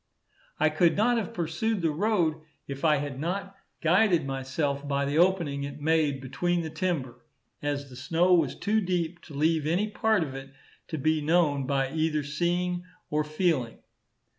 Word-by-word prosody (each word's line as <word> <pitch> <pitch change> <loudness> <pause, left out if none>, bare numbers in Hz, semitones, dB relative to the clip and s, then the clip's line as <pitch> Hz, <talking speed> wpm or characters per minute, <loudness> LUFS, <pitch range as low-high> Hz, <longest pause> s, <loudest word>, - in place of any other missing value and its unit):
I 155 - +4
could 165 +3 +2
not 240 +3 +3
have 210 -6 -2
pursued 175 +5 -2
the 165 - +2
road 170 -3 +1 0.3
if 140 +2 -6
I 155 -2 +5
had 140 -2 -4
not 195 +5 -3 0.3
guided 175 -1 +3
myself 140 +1 -2
by 140 0 0
the 145 +3 0
opening 170 -6 +2
it 140 +1 -6
made 150 -3 +1
between 175 +6 -1
the 160 - -5
timber, 145 -8 -3 0.4
as 145 -1 -2
the 130 - -12
snow 165 +8 +2
was 160 -7 +3
too 215 +1 +1
deep 175 -2 -2
to 150 - -11
leave 155 +1 +1
any 185 +7 +1
part 215 -3 +2
of 140 -4 -6
it 135 0 -9 0.3
to 160 - -4
be 155 +2 +1
known 150 -4 +2
by 135 -1 0
either 155 -1 0
seeing 175 +4 -1 0.3
or 150 0 +1
feeling. 150 -6 0
160 Hz, 170 wpm, -27 LUFS, 140-175 Hz, 0.4 s, I